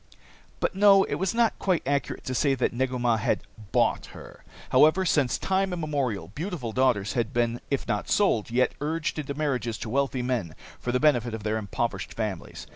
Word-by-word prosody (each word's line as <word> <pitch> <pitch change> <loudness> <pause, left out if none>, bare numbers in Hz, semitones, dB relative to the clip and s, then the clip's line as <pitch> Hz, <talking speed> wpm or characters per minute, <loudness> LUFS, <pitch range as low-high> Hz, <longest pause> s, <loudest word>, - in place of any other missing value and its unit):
But - - 0
no, 195 0 +6
it - - -3
was 190 +3 0
not 235 -1 +2
quite 185 -4 +1
accurate 140 -1 -1
to 130 - -4
say 135 +2 +2
that 125 - 0
Negu 130 +1 -1
Mah 120 -2 +2
had 110 - 0 0.3
bought - - +1
her. - - -13 0.3
However, 165 +5 +5
since 140 -8 +2
time 190 0 0
immemorial 140 - -2
beautiful 150 - -4
daughters 115 -5 +1
had 120 -1 -1
been, 120 -1 0
if 140 - -1
not 105 - -2
sold, 195 - +2
yet 125 +2 +2
urged 155 +1 -2
into 140 -1 -4
marriages 125 -7 -1
to 110 +2 -6
wealthy 135 -1 0
men 115 -11 -2 0.2
for 125 - -2
the 125 - +1
benefit 120 -6 +2
of 110 - -8
their 110 +1 0
impoverished 100 -3 -3
families. - - -4
130 Hz, 190 wpm, -26 LUFS, 115-155 Hz, 0.3 s, no